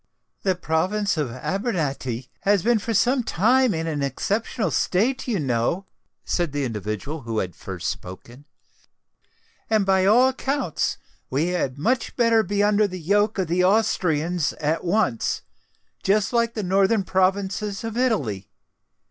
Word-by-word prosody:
"The 190 -2 +1
province 185 +5 0
of 150 -5 -1
Abrantani 135 - -3
has 200 -2 +2
been 235 -1 +3
for 230 - -4
some 245 +5 +3
time 245 +6 +3
in 160 0 -2
an 155 -3 -2
exceptional 195 - -1
state, 235 +10 +1
you 220 -6 0
know," 130 +7 0 0.4
said 170 -5 -1
the 145 -1 -1
individual 110 +7 -4
who 115 -3 -4
had 90 -5 -2
first - - -6
spoken; 120 +9 -7 1.2
"and 215 -2 +2
by 190 -1 +3
all 245 +5 +6
accounts, 265 - -1 0.3
we 150 +7 0
had 145 -7 -1
much 235 - 0
better 230 -2 +4
be 205 -1 0
under 210 0 +3
the 185 -1 -7
yoke 205 +6 +1
of 190 - +1
the 175 +2 +1
Austrians 180 -5 +1
at 155 +2 -1
once—just 200 - -2
like 235 -1 +1
the 215 - -2
northern 195 +3 +2
provinces 190 +2 0
of 225 -1 -4
Italy. 145 - 0
190 Hz, 140 wpm, -23 LUFS, 150-215 Hz, 1.2 s, all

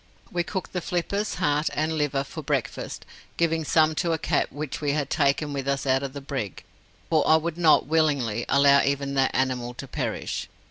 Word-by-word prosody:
We 175 - 0
cooked 185 +2 -5
the 180 - -1
flippers, 200 +5 -2
heart, 150 +1 +1
and 155 +1 0
liver 145 -2 0
for 135 - -8
breakfast, - - -3 0.3
giving 165 -1 +1
some 155 +1 +3
to 170 -2 0
a - - +1
cat - - 0
which 150 0 -5
we 145 -1 +1
had 145 -2 -2
taken 145 0 +1
with 135 -1 -4
us 140 0 0
out 130 0 +2
of 135 -1 -5
the 140 - -6
brig, 135 - -5 0.5
for 155 -2 +4
I 155 - +7
would 160 0 -1
not, 165 -3 +4
willingly, 140 -7 +1
allow 140 0 +6
even 140 0 -1
that 135 -1 +1
animal 125 -2 -1
to 135 - -8
perish. - - -3
145 Hz, 195 wpm, -25 LUFS, 135-160 Hz, 0.5 s, I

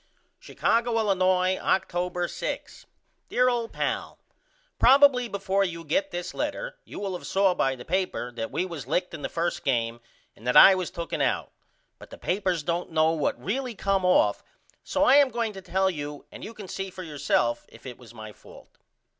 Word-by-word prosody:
Chicago, 235 0 0
Illinois, 185 -3 +2
October 180 -1 0
6. - - -6 0.4
DEAR 250 0 +3
OLD 235 -2 -2
PAL: - - -3 0.6
Probily 270 -2 +6
before 195 0 0
you 170 -3 -4
get 290 - 0
this 175 0 -5
letter - - -4
you - - -9
will 200 -2 -3
of 180 - -7
saw 195 -1 +3
by 135 -5 0
the 125 - -11
paper 180 -9 -2
that 115 -1 -5
we 180 - -1
was 160 -9 -7
licked 180 +5 -1
in 160 - -7
the - - -3
first 170 +1 -2
game 120 -3 -1 0.3
and 115 - -12
that 125 - +4
I 195 - +10
was 185 -2 -2
tooken 170 -1 -4
out - - 0 0.5
but - - -13
the - - -11
papers 185 -4 -1
don't 170 +3 -2
know 160 -1 +3
what 160 -3 -1
really 250 +3 -3
come 195 -1 0
off 180 0 +3 0.4
so 285 - 0
I 285 -2 +6
am 285 -2 +5
going 230 -2 -2
to 190 - -9
tell 190 +1 0
you 145 -3 -7
and - - -10
you 225 - -8
can 205 -3 -9
see 195 +1 -5
for 185 0 -9
yourself 140 -6 0
if 115 - -17
it 125 -2 -8
was 120 -2 -14
my 110 -2 -10
fault. - - -17
185 Hz, 190 wpm, -26 LUFS, 155-210 Hz, 0.6 s, I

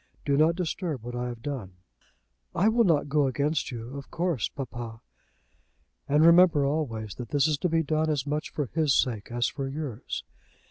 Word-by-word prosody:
Do 140 - +2
not 155 +3 +4
disturb 170 - -3
what 120 +1 -6
I 125 0 -2
have 120 -2 -7
done." 125 -10 -5 0.8
"I 190 +5 +4
will 230 +1 +3
not 155 -5 +3
go 145 -1 +2
against 145 +3 0
you, 120 +1 -7
of 140 -1 -8
course, 170 -9 -1
papa." 120 -4 -6 1.1
"And 150 +3 +5
remember 170 -4 +6
always 120 -8 -2
that 120 -3 -6
this 145 +1 +3
is 150 -2 0
to 180 - 0
be 165 0 +2
done 155 +1 0
as 145 -4 0
much 150 +1 -2
for 145 - -2
his 155 -5 +3
sake 115 -5 -1
as 120 0 +1
for 135 +4 -2
yours. 135 - -5
145 Hz, 185 wpm, -27 LUFS, 120-160 Hz, 1.1 s, remember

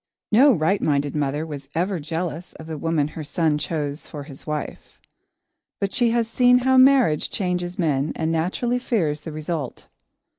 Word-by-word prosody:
No 265 +7 +7
right 190 0 +1
minded 145 -1 0
mother 145 +1 -1
was 140 -3 -8
ever 180 +2 0
jealous 165 +2 -4
of 160 - -11
the 160 0 -5
woman 160 -2 0
her 155 - -7
son 150 0 0
chose 150 -2 -3
for 150 -3 -7
his 140 0 -12
wife. 150 -1 -5 0.8
But 200 -1 -2
she 240 -1 +3
has 230 -1 +1
seen 245 +2 +4
how 260 +1 +3
marriage 255 - +5
changes 180 -1 -2
men 150 -5 0
and 160 0 -1
naturally 185 +10 0
fears 165 -12 -1
the 160 - -7
result. 155 -3 -5
160 Hz, 165 wpm, -23 LUFS, 150-200 Hz, 0.8 s, No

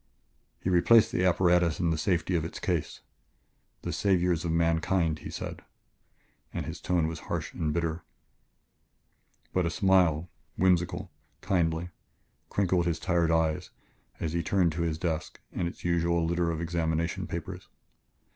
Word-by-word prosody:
He - - -2
replaced 105 +6 +5
the 90 - 0
apparatus 90 -2 +3
in 85 -2 +1
the - - +1
safety 85 +2 0
of 80 - +1
its 80 - -6
case. 85 -4 -2 0.8
"The 85 - -3
saviors 90 -2 +2
of 85 - -1
mankind!" 85 0 +1
he - - -8
said, - - -6 0.9
and - - -4
his - - -7
tone 90 -3 +1
was 80 0 -3
harsh - - -3
and 75 -2 -1
bitter. 85 +1 -1 1.5
But 90 -2 +2
a - - 0
smile, 90 -4 +3 0.3
whimsical, 90 0 +1 0.3
kindly, 85 -1 0 0.6
crinkled 90 -3 +1
his 85 - 0
tired 85 -2 +1
eyes 80 -1 +1 0.5
as 80 -1 -2
he 85 - +1
turned 90 -1 +2
to 85 +2 -3
his 80 -2 0
desk 80 -2 -3
and 90 - -2
its 85 - -9
usual 85 -1 +2
litter 85 0 +1
of 80 0 -2
examination 85 -1 -1
papers. - - -6
85 Hz, 145 wpm, -29 LUFS, 80-90 Hz, 1.5 s, replaced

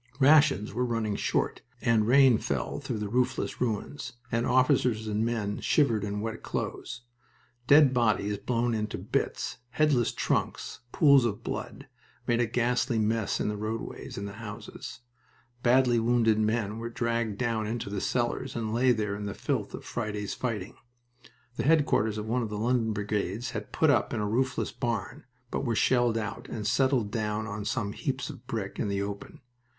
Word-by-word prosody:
Rations 145 -6 +5
were 125 +3 0
running 115 -4 -1
short, - - -1 0.2
and 115 -4 +2
rain 130 -2 +6
fell - - -2
through - - -4
the 105 -1 -3
roofless 125 +4 -1
ruins, 125 +3 -2 0.2
and 115 +1 +1
officers 125 -3 +3
and 105 +1 0
men 110 -3 -1
shivered 115 -9 +2
in 105 0 -3
wet 110 0 -4
clothes. 120 +1 -4 0.7
Dead 145 -1 +7
bodies 105 -4 +1
blown 120 -1 0
into 105 -1 -2
bits, - - -2
headless 135 -3 +2
trunks, - - -2
pools 140 -4 +6
of 110 -4 -2
blood, - - -5 0.4
made 120 0 +2
a 120 - +2
ghastly 120 +1 +1
mess 110 -1 0
in - - 0
the 105 - -1
roadways 110 +2 -5
and 100 +1 -4
the 100 - -7
houses. 110 +2 -8 0.6
Badly 125 -1 +4
wounded 115 -2 +3
men 110 0 0
were 115 +1 -4
dragged 115 -4 -1
down 115 -3 -1
into 115 0 -3
the 100 -2 -2
cellars, 125 +1 -1
and 110 -2 -2
lay 125 +2 +4
there 105 -3 -1
in 105 0 -4
the 100 - -5
filth - - -2
of - - -10
Friday's 105 -3 -3
fighting. 115 -3 -4 0.8
The - - 0
headquarters 135 -8 +3
of 105 - -3
one 120 +3 0
of 115 - -3
the 105 - -4
London 115 0 +1
brigades 105 +2 -2
had 105 -2 -6
put 160 -2 +3
up 120 -3 +1
in - - -1
a 105 - 0
roofless 125 +4 0
barn, 120 -1 -3 0.3
but - - -2
were 120 -4 0
shelled 120 -1 +3
out, 105 -2 -5
and 105 -2 -5
settled 120 -1 +2
down 110 -1 -1
on 105 -1 -5
some 105 -3 -1
heaps 135 -2 -3
of 120 - -14
brick 105 -4 -4
in - - 0
the 100 0 -1
open. 100 +4 -7
115 Hz, 175 wpm, -28 LUFS, 105-125 Hz, 0.8 s, Dead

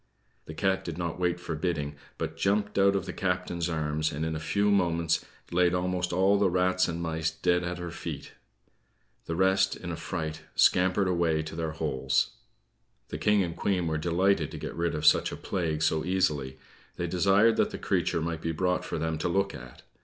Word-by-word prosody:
The 80 - -8
cat 95 0 +1
did 85 -3 -5
not 85 -1 -3
wait 90 -1 0
for 85 -2 -5
bidding, 75 -3 -2 0.2
but 80 - -4
jumped 100 +4 0
out 100 0 +5
of 95 - -1
the 90 - -5
captain's 90 -2 -1
arm, 75 -2 -2
and 75 +3 -3
in 80 0 -2
a - - -3
few 100 +6 +1
moments 85 -4 +1 0.3
laid 90 0 +3
almost 90 0 -1
all 95 +3 +3
the 100 -2 +3
rats 90 +1 +2
and 85 0 -3
mice 80 -1 -1
dead 90 +2 +1
at 90 0 -3
her 90 -1 -5
feet. - - -6 1.0
The 80 - -2
rest, 95 +1 +3
in 90 - -6
a - - -3
fright, 80 -2 -4
scampered 95 +2 +4
away 85 -3 +1
to 80 0 -7
their 80 -1 -3
holes. 65 -4 0 0.8
The 75 - -5
King 105 +3 +3
and 85 -2 -4
Queen 95 -4 0
were 80 -1 -1
delighted 90 +4 +2
to - - -8
get - - -5
rid 85 -1 -1
of 75 0 -3
such - - +5
a - - -6
plague 80 -4 -2
so 80 0 +2
easily. 75 -8 0 0.4
They 85 - -2
desired 100 +6 +4
that - - +3
the - - -6
creature 85 - 0
might 80 0 -3
be 80 - -1
brought 90 +2 0
for - - -4
them 80 0 -2
to - - -1
look 100 +2 +1
at. 60 0 -11
85 Hz, 205 wpm, -28 LUFS, 80-95 Hz, 1.0 s, out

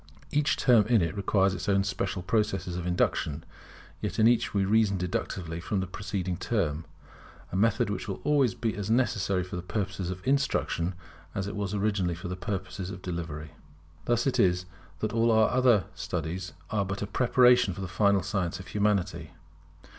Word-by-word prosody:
Each 150 0 +2
term 115 -5 +5
in 115 -6 +4
it 85 +4 -2
requires 100 -1 +2
its 105 - -4
own 100 -1 +3
special 95 -1 -2
processes 95 -3 0
of 90 0 -3
induction; 80 -3 0 0.6
yet - - -3
in 110 - +5
each 120 -1 +3
we 100 -1 +1
reason 105 -1 +3
deductively 90 -2 -3
from 95 +3 -2
the 95 - -1
preceding 95 -2 -3
term, 85 -7 -1 0.7
a - - -4
method 115 +2 +2
which 95 - -4
will 95 - -4
always 140 -7 +3
be 115 -2 -2
as 105 0 -4
necessary 100 -6 +1
for 90 0 -5
purposes 95 -1 -3
of 90 0 -6
instruction 95 -10 +1 0.4
as 100 - -1
it 100 - -5
was 100 -1 -2
originally 100 -4 0
for 85 +1 -7
the 90 - -3
purpose 95 +1 -5
of 95 0 -5
discovery. 80 -3 -5 0.5
Thus 120 0 +1
it 135 - +1
is 90 -1 +3 0.4
that 110 0 -1
all 115 0 +3
our 110 -1 +4
other 125 -6 +4
studies 90 +2 -4 0.2
are 105 -2 +1
but 100 +1 -4
a - - -1
preparation 125 -1 +4
for 95 - -6
the 95 - -3
final 100 +1 +2
science 90 -3 -2
of 95 - -10
Humanity. 100 -6 0
100 Hz, 180 wpm, -28 LUFS, 90-110 Hz, 0.7 s, term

